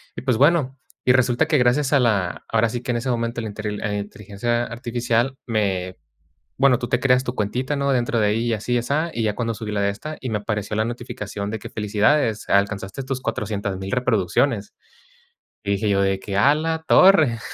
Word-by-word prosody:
Y - - -7
pues, 130 -2 +2
bueno 140 -2 +3 0.3
y 125 - +5
resulta 125 -1 +2
que 155 - +3
gracias 130 +3 +2
a 140 - +5
la 100 -8 0
ahora 115 0 +2
sí 120 +2 -4
que 125 0 -3
en 120 - 0
ese 120 +3 -3
momento 115 -1 -1
a - - -6
la - - -4
interil 105 0 -5
eh, 105 -1 -2
inteligencia 105 +4 -3
artificial 120 +1 -1
me 95 -5 -1 0.6
bueno, 130 -2 +4
tú 120 - -4
te 125 - +1
creas 125 -1 +3
tu 125 - -3
cuentita, 125 +7 -1
¿no?, 140 0 0
dentro 120 -2 +1
de 105 - +3
ahí, 110 +3 0
y 115 - +1
así 110 +3 -2
y - - +3
asá, 145 +7 -1
y 115 - -2
ya 105 -1 0
cuando 115 -2 -2
subí 105 0 -6
la 105 -1 -1
de 100 - +2
esta, 155 +10 -6
y 130 - -4
me 110 - 0
apareció 105 0 -3
la 110 +1 +1
notificación 105 -4 -5
de 110 - -3
que: - - -9
"Felicidades, 110 +3 +1
alcanzaste 100 +4 0
tus 130 0 -3
400,000 100 -4 -3
reproducciones, 115 -1 0 0.9
y 100 - -1
dije 105 +2 -1
yo 100 -1 +2
de 95 0 +1
que: 100 0 -4
"A 135 +8 +5
la 160 +1 -2
torre". 160 -12 +5
115 Hz, 215 wpm, -22 LUFS, 105-125 Hz, 0.9 s, y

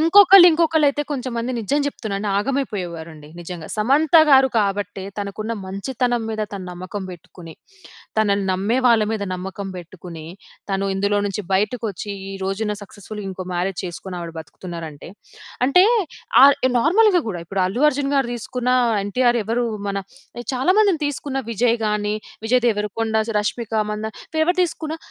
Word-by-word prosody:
ఇంకొకళ్ళు, 370 +2 +8
ఇంకొకళ్ళు 320 -2 +3
అయితే, 285 +1 -1
కొంచెం 255 -3 -3
మంది 235 +2 -2
నిజం 255 +7 0
జెప్తున్నాను 215 -7 -3
ఆగమైపోయేవారండి 175 - -3
నిజంగా. 170 -2 -7
సమంత 275 +9 +2
గారు 265 -1 +6
కాబట్టే, 200 -1 -1 0.2
తనకు 200 0 -5
ఉన్న 225 - -3
మంచితనం 240 +5 -2
మీద 215 -1 -2
తను 195 -2 -6
నమ్మకం 185 +3 -6
బెట్టుకొని, 170 -1 -12 0.7
తనని 200 -2 +2
నమ్మే 205 +7 0
వాళ్ళ 230 -2 +5
మీద 215 -2 -2
నమ్మకం 190 +2 -6
బెట్టుకొని, 170 -2 -10 0.5
తను 195 0 0
ఇందులో 200 +1 +1
నుంచి 205 +1 -3
బయటకొచ్చి, 210 0 -1 0.2
ఈ - - -6
రోజున 210 +2 -2
సక్సెస్ఫుల్ 205 +1 -9
ఇంకో 185 0 -6
మ్యారేజ్ 180 +1 -2
చేసుకొని 180 +1 -6
ఆవిడ 170 -1 -6
బ్రతుకుతున్నారంటే. 160 0 -8 0.6
అంటే, 360 +7 +6 0.6
ఆహ్, 280 0 +7 0.2
నార్మల్‌గా 365 - +4
గూడా 175 -4 -4
ఇప్పుడు 195 +1 -1
అల్లు 220 +9 -2
అర్జున్ 280 0 -2
గారు 270 -3 +2
దీసుకున్న, 250 +2 -3 0.3
ఎన్టీఆర్ 240 +3 +2
ఎవరు, 235 +3 0 0.2
మన 200 0 -1 0.6
చాలా 265 +9 +2
మందిని 380 -7 +2
తీసుకున్న, 280 -1 -3
విజయ్ 235 +1 +2
గాని, 210 0 0 0.3
విజయ్ 250 +1 +2
దేవరకొండ, 220 +1 -2 0.3
రష్మిక 225 +2 -3 0.2
మందాన 215 +1 -4 0.3
ఎవరు 355 +1 +1
తీసుకున్న, 320 -2 -5
210 Hz, 145 wpm, -21 LUFS, 190-260 Hz, 0.7 s, ఇంకొకళ్ళు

